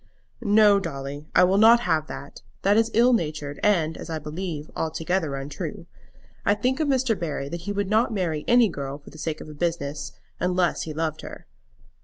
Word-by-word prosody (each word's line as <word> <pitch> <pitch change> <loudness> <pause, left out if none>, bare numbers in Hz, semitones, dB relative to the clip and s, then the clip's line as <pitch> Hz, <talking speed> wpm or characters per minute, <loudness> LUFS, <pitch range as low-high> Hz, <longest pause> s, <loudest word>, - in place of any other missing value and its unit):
"No, 210 -2 +5
Dolly; 145 -3 -6
I - - +7
will 190 +2 +4
not 230 +2 +7
have 160 -7 0
that! 140 - -9 0.2
that 200 +1 +4
is 225 +1 +3
ill 240 +3 +5
natured, 150 -7 -2
and, 165 -6 +2
as - - -8
I 160 - -2
believe, 155 0 -5
altogether 160 -1 -1
untrue. 140 +1 -6 0.6
I 205 - +3
think 255 +6 0
of 310 - +1
Mr. 260 -4 +2
Barry 155 -6 -4
that 170 +2 -5
he - - 0
would 205 -1 -1
not 220 +3 +2
marry 170 -7 -1
any 240 -1 +6
girl 140 -6 -5
for 145 - -15
the 155 - -13
sake 155 0 -3
of - - -9
the 155 - -9
business, 145 -3 -3 0.3
unless 180 -1 +1
he - - -4
loved 155 -1 -2
her." - - -10
170 Hz, 195 wpm, -25 LUFS, 150-205 Hz, 0.6 s, I